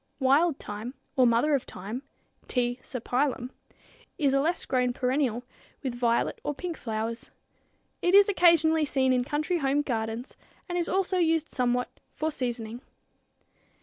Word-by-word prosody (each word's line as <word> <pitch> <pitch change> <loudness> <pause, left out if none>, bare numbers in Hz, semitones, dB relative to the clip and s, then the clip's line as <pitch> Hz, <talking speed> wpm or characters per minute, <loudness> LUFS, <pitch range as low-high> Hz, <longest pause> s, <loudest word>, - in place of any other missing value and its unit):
Wild 280 +4 +3
thyme, 215 +5 -7 0.2
or 255 -2 +5
mother 235 +6 +3
of 275 - +3
thyme 210 +7 -6 0.5
(T. 245 -1 0
serpyllum, 255 +2 -1
Linn.), 250 0 -7 0.7
is 285 -6 +2
a 275 - +3
less 335 +5 0
grown 250 -1 +1
perennial, 250 -2 0 0.4
with 260 -3 -2
violet 240 -1 0
or 295 - -2
pink 345 +3 -4
flowers. 225 -1 -4 0.7
It 355 +2 +3
is 400 0 +8
occasionally 335 -4 +4
seen 260 -2 +2
in 250 -1 +2
country 305 +6 -1
home 280 +1 +1
gardens, 225 -1 -3 0.3
and 350 - -4
is 350 0 0
also 380 -1 +1
used 325 -2 +2
somewhat 250 -1 -1 0.2
for 315 +1 -1
seasoning. 240 -4 -4
265 Hz, 150 wpm, -28 LUFS, 245-315 Hz, 0.7 s, is